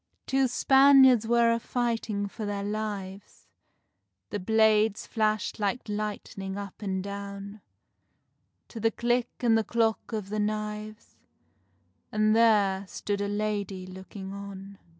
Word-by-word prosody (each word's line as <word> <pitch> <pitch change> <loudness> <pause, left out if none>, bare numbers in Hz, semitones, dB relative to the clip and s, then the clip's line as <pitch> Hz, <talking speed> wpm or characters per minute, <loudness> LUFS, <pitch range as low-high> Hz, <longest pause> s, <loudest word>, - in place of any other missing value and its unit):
Two 270 0 +2
Spaniards 265 -2 +6
were 235 0 +4
a 230 - +1
fighting 230 -4 -2
for 215 +2 -8
their 205 -1 -3
lives, 205 -2 -5 0.9
The 205 - -2
blades 220 +1 +3
flashed 215 -1 -1
like 210 +4 -1
lightning 205 -2 -4
up 200 0 -8
and 190 -2 -2
down; 200 +1 -7 1.1
To 230 - -8
the 225 +1 +3
click 240 +1 0
and 235 -2 +4
the 225 - +2
clock 225 0 0
of 210 -3 -4
the 215 +1 -2
knives, 215 0 -4 0.9
And 215 0 +2
there 200 -4 +3
stood 200 +2 -3
a 205 - -1
lady 205 -2 -2
looking 190 +1 -9
on. 200 0 -9
210 Hz, 130 wpm, -28 LUFS, 200-225 Hz, 1.1 s, Spaniards